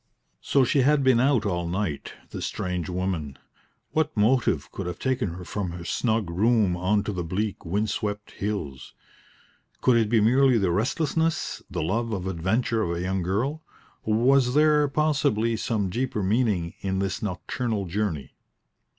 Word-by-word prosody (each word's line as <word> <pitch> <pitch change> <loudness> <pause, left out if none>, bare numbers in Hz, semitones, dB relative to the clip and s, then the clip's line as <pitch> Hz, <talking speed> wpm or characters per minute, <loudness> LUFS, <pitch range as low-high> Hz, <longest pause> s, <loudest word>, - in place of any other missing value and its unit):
So 140 - +3
she 135 +3 +2
had 140 +2 +3
been 130 -3 +4
out 125 -3 +3
all 85 -3 -1
night, 90 -4 -3 0.2
this - - -3
strange 90 -3 -3
woman. 90 -6 -3 0.5
What 155 -4 0
motive 105 - +2
could 95 - -5
have 90 - -4
taken 130 -9 -1
her 90 0 -8
from 90 0 -3
her 85 0 -8
snug 110 -2 0
room 105 0 +2
on 95 +4 +1
to 105 - -3
the 90 -2 -3
bleak, 95 +5 -3
wind 105 +5 0
swept 105 -1 -3
hills? 100 -10 -5 0.8
Could 125 -2 +4
it 110 -2 +2
be 115 0 +4
merely 125 +3 +4
the 95 -5 +1
restlessness, 160 - 0
the - - -3
love 115 +7 -1
of 95 -3 -3
adventure 105 +6 0
of 85 -4 -1
a - - -3
young 95 +1 -1
girl? 115 - -1 0.4
Or 110 - 0
was 130 +1 +3
there, 150 -1 +4
possibly, 140 -6 +1
some 105 -4 -1
deeper 120 -2 -1
meaning 100 -5 +1
in 95 -1 -2
this 95 0 -2
nocturnal 105 +2 -2
journey? 85 -7 -3
105 Hz, 165 wpm, -25 LUFS, 90-125 Hz, 0.8 s, been